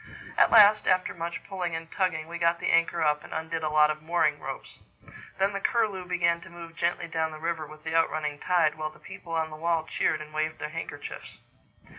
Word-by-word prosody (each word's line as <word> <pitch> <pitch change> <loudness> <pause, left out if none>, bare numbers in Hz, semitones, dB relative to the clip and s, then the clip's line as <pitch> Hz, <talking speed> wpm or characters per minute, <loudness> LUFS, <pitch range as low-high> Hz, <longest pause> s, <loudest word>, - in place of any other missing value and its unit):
At - - +5
last, 210 0 +7
after 185 0 +2
much 170 -1 -5
pulling 180 -4 -3
and 165 0 -7
tugging, 165 -5 -1
we 170 0 -6
got 170 0 +3
the - - 0
anchor 170 0 +2
up 150 -1 +1
and - - -12
undid 160 0 -3
a 155 - -1
lot 150 0 +5
of 155 0 -6
mooring 170 +3 +1
ropes. - - -8 0.6
Then 195 +1 +1
the 200 - -2
Curlew 210 -6 0
began 170 -1 +1
to - - -12
move 170 -1 -11
gently 170 0 -1
down 160 -1 -1
the 155 - -8
river 160 -1 -3
with 155 0 -14
the 160 0 -3
out 165 0 +4
running 150 -2 -3
tide, 170 -4 +2
while 155 0 -2
the 155 - -17
people 165 +2 -10
on 160 -1 -1
the - - -7
wall 165 0 0
cheered 155 - 0
and 155 0 -10
waved 155 +1 -1
their - - -5
handkerchiefs. 165 +2 -7
165 Hz, 225 wpm, -27 LUFS, 155-175 Hz, 0.6 s, last